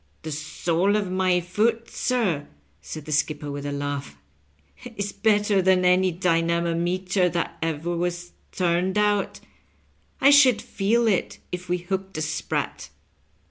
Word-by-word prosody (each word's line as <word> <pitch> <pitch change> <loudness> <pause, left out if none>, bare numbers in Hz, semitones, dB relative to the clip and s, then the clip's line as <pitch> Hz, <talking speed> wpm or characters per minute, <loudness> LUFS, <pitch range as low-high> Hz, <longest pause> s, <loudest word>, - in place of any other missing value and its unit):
" - - -40
The 155 - -5
sole 165 +6 0
of 200 -3 -1
my 185 -1 +2
foot, 220 +6 0
sir," 210 - 0 0.3
said 150 - -8
the 155 - -7
skipper 145 0 -1
with 145 0 -5
a - - -3
laugh, 140 - -4 0.4
" 230 - -15
is 200 0 -2
better 210 -2 +2
than 185 0 +3
any 185 +1 +4
dynamometer 170 +2 +1
that 170 -1 -3
ever 165 +1 -2
was 175 0 -3 0.2
tume<i 180 +2 0
out. 205 -1 +1 0.8
I 275 +2 +6
should 265 -6 +6
feel 230 0 0
it 205 -5 0
if 180 -1 -6
we 180 - +1
hooked 190 +1 -4
a 155 - -1
sprat." 155 +1 -3
180 Hz, 145 wpm, -24 LUFS, 165-200 Hz, 0.8 s, I